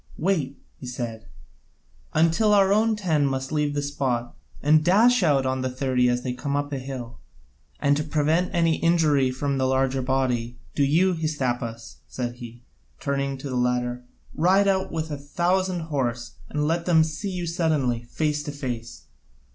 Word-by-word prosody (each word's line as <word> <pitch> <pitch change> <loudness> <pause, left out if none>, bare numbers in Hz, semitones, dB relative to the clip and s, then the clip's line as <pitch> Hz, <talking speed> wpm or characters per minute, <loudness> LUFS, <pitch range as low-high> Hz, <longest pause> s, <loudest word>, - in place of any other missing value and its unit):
"Wait," 155 -6 0 0.2
he 130 - -8
said, 115 -3 -5 0.9
"until 170 +7 +4
our 195 -1 +5
own 220 +1 +3
ten 165 -8 +1
must 135 -1 -1
leave 150 -1 0
the 145 - -1
spot 130 -4 -2 0.2
and 150 +2 +5
then - - -6
dash 225 +8 +5
out 145 -6 +3
on 130 0 -1
the 130 - -1
thirty 125 -1 +1
as 125 0 0
they 125 - -2
come 140 +3 -3
up 145 0 -2
the 140 - -2
hill. 125 -3 -7 0.6
And 145 0 +3
to 150 - -1
prevent 155 +4 +1
any 165 -2 +2
injury 155 -6 +3
from 135 +1 -2
the 130 - +2
larger 130 0 +1
body, 125 -2 -1 0.2
do 145 - +1
you, 170 +7 +3
Hystaspas," 125 -8 -3
said 120 -1 -4
he, 120 0 -10 0.4
turning 140 -1 -2
to 135 +2 -7
the - - -2
latter, 125 0 0 0.3
"ride 190 +5 +3
out 190 -1 +1
with 160 -1 -3
a 145 - -4
thousand 175 +5 0
horse, 130 -7 -2 0.2
and 150 0 -1
let 170 +2 -1
them 160 -3 +5
see 160 +6 -4
you 180 -2 -3
suddenly, 155 -9 0
face 150 +4 -1
to 145 0 -5
face. 120 - -6
145 Hz, 175 wpm, -25 LUFS, 125-165 Hz, 0.9 s, our